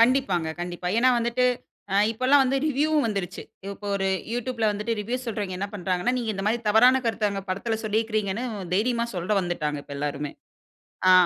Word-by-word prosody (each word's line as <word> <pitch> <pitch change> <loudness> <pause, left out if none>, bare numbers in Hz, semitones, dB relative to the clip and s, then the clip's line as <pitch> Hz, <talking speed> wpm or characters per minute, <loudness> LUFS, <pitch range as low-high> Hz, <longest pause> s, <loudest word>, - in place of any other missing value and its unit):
கண்டிப்பாங்க 230 -9 +3
கண்டிப்பா. 175 0 -4
ஏன்னா 255 +2 +5
வந்துட்டு, 235 +2 +1 0.5
அ - - +1 0.2
இப்பல்லாம் 255 +5 +4
வந்து 265 +1 +1
ரிவ்யூவும் 300 +1 +2
வந்துருச்சு. 195 -4 -3 0.3
இப்போ 200 +1 -8
ஒரு 195 -1 0 0.2
யூட்யூப்ல 240 -2 0
வந்துட்டு 210 +3 -2
ரிவ்யூஸ் 250 +4 -3
சொல்றவங்க 205 -4 -3
என்ன 200 +2 -2
பண்றாங்கன்னா, 185 +5 0
நீங்க 235 -3 -1
இந்த 195 0 -4
மாரி 230 +3 +1
தவறான 250 +5 +6
கருத்த 220 -2 +1
அங்க 195 -1 -4
படத்துல 220 +4 -1
சொல்லீக்குறீங்கன்னு, 215 0 0 0.3
தைரியமா 235 +3 +1
சொல்ல 185 +3 +1
வந்துட்டாங்க 155 -4 -2
இப்ப 140 - -8
எல்லாருமே. 145 0 -3 0.8
ஆ. - - +9
215 Hz, 165 wpm, -25 LUFS, 190-245 Hz, 0.8 s, ஆ